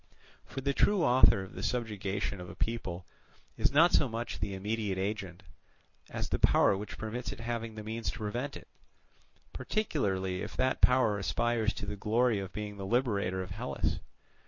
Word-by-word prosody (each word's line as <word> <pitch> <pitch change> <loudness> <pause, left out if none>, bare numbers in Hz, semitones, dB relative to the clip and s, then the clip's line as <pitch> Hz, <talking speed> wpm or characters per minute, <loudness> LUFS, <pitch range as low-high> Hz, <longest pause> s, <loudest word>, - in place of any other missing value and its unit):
For 135 - -5
the 140 +1 0
true 200 +4 +3
author 120 -7 +6
of 95 - -11
the 90 - -6
subjugation 100 -4 -2
of 90 - -8
a - - -9
people 95 -6 -3 0.5
is - - +2
not 160 +5 +6
so 135 - +4
much 115 +1 -4
the 100 -1 -2
immediate 105 0 -2
agent, 95 -2 -3 0.7
as - - -4
the - - -1
power - - +5
which 105 +2 -6
permits 115 +3 -4
it - - -8
having 115 -1 -3
the 110 - -6
means 110 +2 -3
to - - -5
prevent 120 +6 -3
it; - - -14 0.9
particularly 100 - -1
if - - -6
that 130 0 +1
power 125 -5 +4
aspires 115 +2 +1
to - - -5
the 105 - -4
glory 115 +2 +2
of 95 -1 -5
being 105 -1 -5
the 100 - -5
liberator 100 -6 +1
of 90 - -9
Hellas. 115 +8 -2
110 Hz, 180 wpm, -31 LUFS, 100-120 Hz, 0.9 s, author